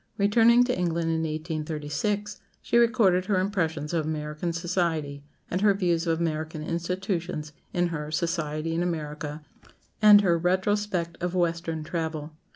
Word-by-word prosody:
Returning 230 Hz, +4 st, +5 dB
to 250 Hz, 0 st, 0 dB
England 170 Hz, -2 st, 0 dB
in 160 Hz, -, 0 dB
1836, 160 Hz, +6 st, -3 dB, 0.2 s
she -, -, -2 dB
recorded 225 Hz, -7 st, +4 dB
her 190 Hz, -1 st, +1 dB
impressions 165 Hz, -6 st, -1 dB
of 165 Hz, -2 st, +1 dB
American 150 Hz, +2 st, -3 dB
society, 165 Hz, -4 st, -2 dB, 0.3 s
and 180 Hz, -, 0 dB
her 205 Hz, -1 st, +4 dB
views 175 Hz, -3 st, 0 dB
of 165 Hz, 0 st, +1 dB
American 155 Hz, -1 st, -2 dB
institutions 170 Hz, -2 st, -3 dB, 0.2 s
in 175 Hz, 0 st, +1 dB
her 150 Hz, -2 st, -4 dB
"Society 165 Hz, -1 st, -2 dB
in 165 Hz, -, 0 dB
America" 150 Hz, -3 st, -4 dB, 0.6 s
and 210 Hz, -1 st, +9 dB
her 170 Hz, -4 st, +2 dB
"Retrospect 185 Hz, -1 st, 0 dB
of 180 Hz, +1 st, -2 dB
Western 165 Hz, -2 st, -1 dB
Travel." 160 Hz, -2 st, -4 dB
170 Hz, 140 wpm, -26 LUFS, 155-185 Hz, 0.6 s, and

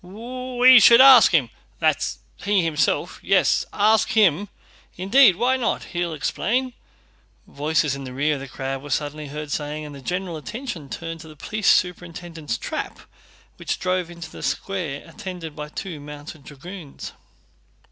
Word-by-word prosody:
"We 250 Hz, +5 st, +3 dB
should 235 Hz, +2 st, +8 dB
ask 260 Hz, -3 st, +9 dB
him... 140 Hz, -10 st, +2 dB, 0.3 s
that's -, -, 0 dB, 0.2 s
he 200 Hz, -2 st, +1 dB
himself?"... 160 Hz, -2 st, 0 dB
"Yes, -, -, +2 dB
ask 215 Hz, +1 st, +3 dB
him 205 Hz, -2 st, +3 dB, 0.5 s
indeed!... 195 Hz, +3 st, +5 dB
Why 250 Hz, +6 st, +1 dB
not? 240 Hz, -3 st, -1 dB
He'll 175 Hz, -2 st, -2 dB
explain"... 245 Hz, -, -1 dB, 0.7 s
voices 150 Hz, 0 st, 0 dB
in 140 Hz, -, -7 dB
the 130 Hz, -, -7 dB
rear 145 Hz, +4 st, 0 dB
of 145 Hz, -, -4 dB
the 135 Hz, -, -8 dB
crowd 135 Hz, +1 st, -5 dB
were 145 Hz, -, -10 dB
suddenly 150 Hz, +1 st, -3 dB
heard 150 Hz, +1 st, -7 dB
saying, 150 Hz, +1 st, -3 dB
and 145 Hz, -, -9 dB
the 140 Hz, -, -10 dB
general 180 Hz, +2 st, -3 dB
attention 170 Hz, -, -7 dB
turned 165 Hz, -1 st, -6 dB
to 160 Hz, -, -12 dB
the 155 Hz, -, -13 dB
police 215 Hz, +6 st, -1 dB
superintendent's 170 Hz, -6 st, -1 dB
trap -, -, -5 dB, 0.6 s
which -, -, -3 dB
drove 185 Hz, -1 st, -1 dB
into 170 Hz, -2 st, -9 dB
the -, -, -10 dB
square 170 Hz, -8 st, -3 dB
attended 165 Hz, -2 st, -8 dB
by 150 Hz, 0 st, -7 dB
two 165 Hz, 0 st, -6 dB
mounted 145 Hz, 0 st, -10 dB
dragoons. 155 Hz, +1 st, -9 dB
165 Hz, 155 wpm, -23 LUFS, 150-205 Hz, 0.7 s, ask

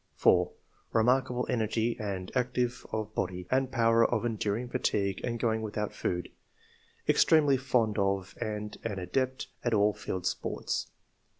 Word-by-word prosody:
4. -, -, +4 dB, 0.2 s
" -, -, -36 dB
Kemarkable 125 Hz, +2 st, +2 dB
energy 115 Hz, -1 st, 0 dB
and 95 Hz, -3 st, -4 dB
activity 125 Hz, -1 st, +1 dB, 0.2 s
of 110 Hz, -2 st, -3 dB
body, 90 Hz, 0 st, -2 dB
and 130 Hz, 0 st, +2 dB
power 115 Hz, -2 st, +4 dB
of 120 Hz, 0 st, +1 dB
enduring 110 Hz, +1 st, -1 dB
fatigue 100 Hz, -5 st, 0 dB
and 120 Hz, -1 st, -2 dB
going 110 Hz, -1 st, +1 dB
without 105 Hz, -1 st, -3 dB
food. 90 Hz, 0 st, -2 dB, 0.8 s
Extremely 150 Hz, -4 st, +5 dB
fond 125 Hz, -5 st, +1 dB
of 95 Hz, -1 st, 0 dB
and 105 Hz, -1 st, -4 dB
an 105 Hz, -3 st, -3 dB
adept 130 Hz, +8 st, -1 dB, 0.2 s
at 120 Hz, -2 st, +2 dB
all 105 Hz, 0 st, +4 dB
field 95 Hz, -2 st, -4 dB
sports. -, -, -2 dB
110 Hz, 140 wpm, -30 LUFS, 105-125 Hz, 0.8 s, Extremely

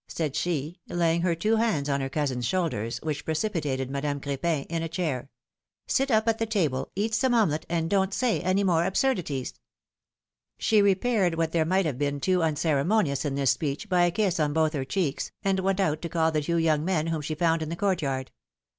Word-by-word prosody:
'^ -, -, -67 dB
said 155 Hz, -5 st, -2 dB
she, 165 Hz, 0 st, -2 dB
laying 170 Hz, -1 st, +1 dB
her 175 Hz, -1 st, +1 dB
two 215 Hz, +7 st, +1 dB
hands 195 Hz, -11 st, +1 dB
on 140 Hz, -1 st, 0 dB
her 135 Hz, -, -2 dB
cousin's 135 Hz, -4 st, -1 dB
shoulders, 125 Hz, -, -1 dB
which 150 Hz, -2 st, -3 dB
precipitated 155 Hz, -7 st, -2 dB
Madame 140 Hz, +1 st, -2 dB
Cr4pin 140 Hz, +2 st, -2 dB
in 165 Hz, 0 st, -2 dB
a 165 Hz, -, -3 dB
chair; 155 Hz, -7 st, -3 dB, 0.6 s
sit 270 Hz, +1 st, +1 dB
up 220 Hz, -2 st, +2 dB
at 225 Hz, -1 st, +2 dB
the 225 Hz, -, 0 dB
table, 160 Hz, -, 0 dB
eat 215 Hz, +3 st, -1 dB
some 245 Hz, +3 st, +2 dB
omelette, 160 Hz, -9 st, +1 dB
and 165 Hz, -1 st, 0 dB
don't 190 Hz, +1 st, +1 dB
say 245 Hz, +3 st, 0 dB
any 185 Hz, +2 st, +1 dB
more 170 Hz, -4 st, +3 dB
absurdities! 180 Hz, -, -1 dB, 0.6 s
" -, -, -65 dB
She 215 Hz, -2 st, +3 dB
repaired 200 Hz, -2 st, +2 dB
what 165 Hz, -1 st, 0 dB
there 165 Hz, -2 st, +2 dB
might 185 Hz, +3 st, +2 dB
have 140 Hz, -5 st, -2 dB
been 145 Hz, 0 st, -1 dB
too 185 Hz, +5 st, +1 dB
uncere 155 Hz, -3 st, +1 dB
monious 165 Hz, -8 st, +1 dB
in 140 Hz, -2 st, -1 dB
this 135 Hz, -3 st, +3 dB
speech 150 Hz, +7 st, -3 dB
by 180 Hz, -1 st, +4 dB
a -, -, +3 dB
kiss 190 Hz, -3 st, 0 dB
on 150 Hz, -1 st, +1 dB
both 160 Hz, 0 st, +2 dB
her 135 Hz, -3 st, -2 dB
cheeks, 155 Hz, -4 st, -2 dB
and 195 Hz, -1 st, +1 dB
went 195 Hz, +1 st, 0 dB
out 155 Hz, -5 st, +1 dB
to 170 Hz, -, -4 dB
call 160 Hz, -1 st, +1 dB
the 155 Hz, -1 st, 0 dB
two 170 Hz, +3 st, -1 dB
young 155 Hz, -2 st, +2 dB
men, 165 Hz, -2 st, 0 dB
w^hom 160 Hz, -2 st, -1 dB
she 155 Hz, +1 st, -3 dB
found 165 Hz, 0 st, +1 dB
in 155 Hz, -, -3 dB
the 170 Hz, -, -3 dB
court 190 Hz, -1 st, 0 dB
yard. 135 Hz, -2 st, -3 dB
165 Hz, 220 wpm, -27 LUFS, 145-190 Hz, 0.6 s, by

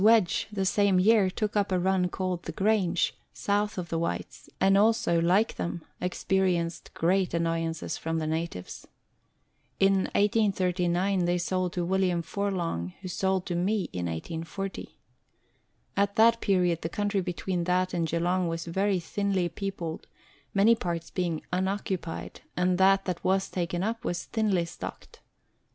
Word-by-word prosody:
Wedge, 215 Hz, -5 st, +4 dB
the 195 Hz, -2 st, -1 dB
same 195 Hz, -1 st, +3 dB
year, 205 Hz, 0 st, +5 dB
took 210 Hz, +3 st, -2 dB
up 205 Hz, -2 st, +1 dB
a 185 Hz, -, +3 dB
run 185 Hz, 0 st, +2 dB
called 185 Hz, -1 st, -2 dB
the -, -, -6 dB
Grange, 195 Hz, -4 st, +1 dB, 0.2 s
south 205 Hz, 0 st, 0 dB
of 175 Hz, -2 st, -4 dB
the 165 Hz, -, -1 dB
Whytes; 170 Hz, -, -4 dB
and 195 Hz, 0 st, +4 dB
also, 205 Hz, -5 st, +3 dB
like 185 Hz, +6 st, +2 dB
them, 170 Hz, -1 st, -4 dB, 0.2 s
experienced 180 Hz, -2 st, 0 dB
great 180 Hz, +1 st, +1 dB
annoyances 165 Hz, -1 st, -1 dB
from 165 Hz, 0 st, -2 dB
the 160 Hz, -, -1 dB
natives. 160 Hz, -, -4 dB, 0.9 s
In 195 Hz, -1 st, +4 dB
1839 190 Hz, -3 st, +2 dB
they 175 Hz, +1 st, +2 dB
sold 185 Hz, 0 st, -1 dB
to 175 Hz, -1 st, -1 dB
William 180 Hz, -2 st, +1 dB
Forlonge, 170 Hz, -, -2 dB
who 190 Hz, -, -6 dB
sold 190 Hz, +1 st, 0 dB
to 175 Hz, -, -3 dB
me 190 Hz, +3 st, 0 dB
in 90 Hz, -1 st, -2 dB
1840. 165 Hz, -, -5 dB, 1.0 s
At 200 Hz, 0 st, +1 dB
that 230 Hz, +1 st, +5 dB
period 180 Hz, -4 st, +2 dB
the 165 Hz, -, -3 dB
country 205 Hz, +2 st, 0 dB
between 180 Hz, 0 st, -2 dB
that 185 Hz, +1 st, +1 dB
and 170 Hz, -2 st, 0 dB
Geelong 175 Hz, +2 st, +1 dB
was 165 Hz, 0 st, -3 dB
very 190 Hz, +3 st, +1 dB
thinly 190 Hz, 0 st, -1 dB
peopled 170 Hz, -3 st, -5 dB, 0.4 s
many 205 Hz, +4 st, +5 dB
parts 170 Hz, -6 st, -3 dB
being 170 Hz, -4 st, -2 dB
unoccupied, 190 Hz, -2 st, -2 dB, 0.2 s
and 180 Hz, 0 st, +2 dB
that 195 Hz, +1 st, +5 dB
that 180 Hz, -2 st, -3 dB
was 190 Hz, +1 st, +1 dB
taken 175 Hz, 0 st, -2 dB
up 225 Hz, +2 st, -2 dB
was 175 Hz, 0 st, -2 dB
thinly 205 Hz, -6 st, 0 dB
stocked. 170 Hz, -, -9 dB
185 Hz, 150 wpm, -28 LUFS, 170-195 Hz, 1.0 s, year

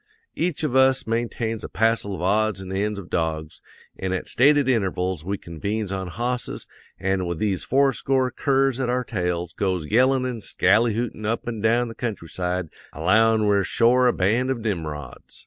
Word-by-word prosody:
Each 170 Hz, -2 st, -2 dB
of 130 Hz, -4 st, -1 dB
us 130 Hz, 0 st, +4 dB
maintains 115 Hz, -1 st, -2 dB
a -, -, -6 dB
passel 110 Hz, -2 st, +1 dB
of 85 Hz, -, -6 dB
odds 105 Hz, +1 st, +1 dB
an' 95 Hz, -1 st, -7 dB
ends 105 Hz, +2 st, -1 dB
of 100 Hz, -3 st, -8 dB
dogs, 80 Hz, -2 st, -2 dB, 0.4 s
an' 95 Hz, 0 st, -2 dB
at 95 Hz, -, -3 dB
stated 145 Hz, +1 st, +4 dB
intervals 95 Hz, -, 0 dB
we 100 Hz, +3 st, -2 dB
convenes 100 Hz, +6 st, -4 dB
on 95 Hz, -1 st, -3 dB
hosses, 120 Hz, +7 st, -3 dB, 0.3 s
an' 95 Hz, -1 st, 0 dB
with 85 Hz, -1 st, -3 dB
these 100 Hz, -1 st, -1 dB
fourscore 135 Hz, -1 st, +2 dB
curs 135 Hz, -1 st, +1 dB
at 125 Hz, -2 st, -1 dB
our 125 Hz, +1 st, 0 dB
tails 90 Hz, -6 st, -2 dB
goes 95 Hz, -5 st, -1 dB
yellin' 130 Hz, -, +3 dB
an' 125 Hz, -3 st, -4 dB
skally 105 Hz, +4 st, +2 dB
hootin' 115 Hz, -2 st, -3 dB
up 115 Hz, +1 st, -2 dB
an' 115 Hz, -2 st, -3 dB
down 120 Hz, +2 st, +2 dB
the 115 Hz, -, -7 dB
countryside 90 Hz, -6 st, -3 dB, 0.2 s
allowin' 110 Hz, +6 st, +3 dB
we're 100 Hz, -1 st, +3 dB
shore 125 Hz, +6 st, +3 dB
a -, -, +5 dB
band 115 Hz, +8 st, +1 dB
of 130 Hz, -3 st, -1 dB
Nimrods. 80 Hz, -9 st, -5 dB
110 Hz, 175 wpm, -23 LUFS, 95-120 Hz, 0.4 s, a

